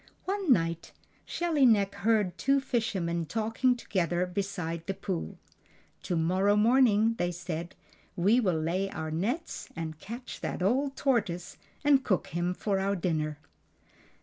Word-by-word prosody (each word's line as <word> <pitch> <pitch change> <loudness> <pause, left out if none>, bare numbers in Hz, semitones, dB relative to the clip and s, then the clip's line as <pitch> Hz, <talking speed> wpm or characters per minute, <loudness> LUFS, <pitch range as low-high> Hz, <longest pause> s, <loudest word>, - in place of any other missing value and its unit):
One 390 -5 0
night 170 -6 +1 0.3
Shelly 335 -5 0
Neck 205 -5 +4
heard 210 -4 +1
two 275 +1 +3
fishermen 190 - -1
talking 225 +4 +1
together 180 -6 0
beside 180 -3 -4
the 195 - -2
pool. 190 -3 -4 0.6
"To 180 - -2
morrow 185 +5 +2
morning," 225 -1 +4
they 175 - +1
said, 170 0 -5 0.4
"we 200 +7 +4
will 185 -9 +1
lay 180 +5 -1
our 160 -2 -5
nets 220 - -3
and 160 -2 -5
catch 235 +7 -8
that - - -3
old 270 +7 +1
tortoise 205 -10 0 0.3
and 280 -2 +5
cook 190 -8 0
him 175 +3 -1
for 195 -1 -1
our 200 +1 0
dinner." 155 -4 -1
195 Hz, 140 wpm, -29 LUFS, 170-235 Hz, 0.6 s, and